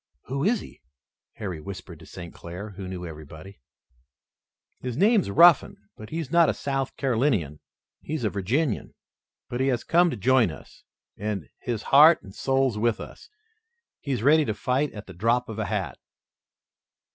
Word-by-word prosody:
"Who 135 +2 -3
is 220 +4 +2
he?" - - -13 0.5
Harry 90 -7 -6
whispered 100 +4 -9
to - - -14
St. 85 -1 -9
Clair, 90 +5 -8
who 95 -1 -8
knew 90 -1 -6
everybody. 80 +2 -11 1.2
"His 125 -1 -5
name's 205 - +3
Ruffin, 170 +9 +6 0.2
but 110 - -11
he's 160 -3 -4
not 170 -1 +5
a - - 0
South 135 -1 -3
Carolinian. 115 - 0 0.4
He's 155 -4 -4
a 105 - 0
Virginian, 115 - -1 0.5
but 120 0 -4
he 135 - +2
has 125 -3 0
come 175 +1 +4
to 125 - -4
join 125 0 +3
us, 75 -5 -12 0.3
and 100 -7 -4
he's 115 -3 -3
heart 155 +4 +6
and 95 - -12
soul 135 +2 +1
with 115 0 +1
us. - - -11 0.7
He's 130 -6 -3
ready 155 +3 +5
to 110 - -2
fight 130 +6 0
at 105 -1 -9
the 95 - -11
drop 115 +7 +1
of 110 -1 -6
a 110 - -1
hat." - - -3
120 Hz, 165 wpm, -25 LUFS, 100-140 Hz, 1.2 s, Ruffin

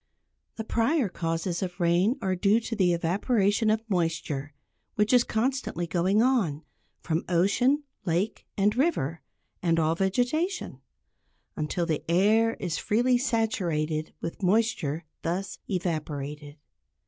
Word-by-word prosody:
The 220 - -4
prior 235 +2 +1
causes 165 0 -2
of 180 -1 -4
rain 175 +8 +2
are 190 -1 +1
due 200 +5 +3
to 230 0 -4
the 185 -4 +3
evaporation 200 +5 +1
of 220 +1 0
moisture 165 -6 -1 0.4
which 210 +3 +2
is 245 -1 +6
constantly 230 -7 -1
going 185 +6 +2
on, 195 - +1 0.4
from 165 0 -1
ocean, 225 - +2 0.2
lake 185 +3 -1
and 205 +2 +2
river, 205 - 0 0.4
and 165 -2 +2
all 160 0 +2
vegetation; 245 - -1 0.7
until 155 +3 -1
the 155 -3 -1
air 215 +6 +3
is 175 -5 -3
freely 245 +3 +2
saturated 180 - -1
with 165 - -5
moisture 180 -6 +1 0.2
thus 180 +4 -3
evaporated. 150 -5 -3
190 Hz, 125 wpm, -27 LUFS, 165-225 Hz, 0.7 s, is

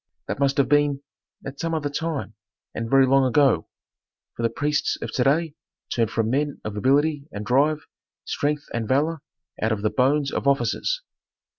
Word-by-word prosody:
that - - -3
must 140 -1 +2
have 140 -2 +3
been 145 0 +2 0.4
at 135 0 -7
some 165 0 -1
other 150 -2 -1
time, 145 -4 -3 0.4
and 115 0 -4
very 135 +1 +6
long 135 +1 +4
ago. 130 - +3 0.7
For - - -5
the 115 - +2
priests 145 +2 0
of - - -5
to 125 - +1
day 155 +3 +2 0.4
turn 115 -2 +2
from 115 +1 -1
men 145 +1 -1
of 110 -1 -5
ability 140 +6 +2
and 105 +1 -6
drive 145 +6 +2 0.4
strength 145 0 -1
and 115 -2 -2
valor 150 +5 +1 0.4
out 110 - +1
of 105 -2 -2
the 105 - +1
bones 140 +2 +2
of - - -2
officers." 140 - +1
140 Hz, 175 wpm, -24 LUFS, 125-150 Hz, 0.7 s, very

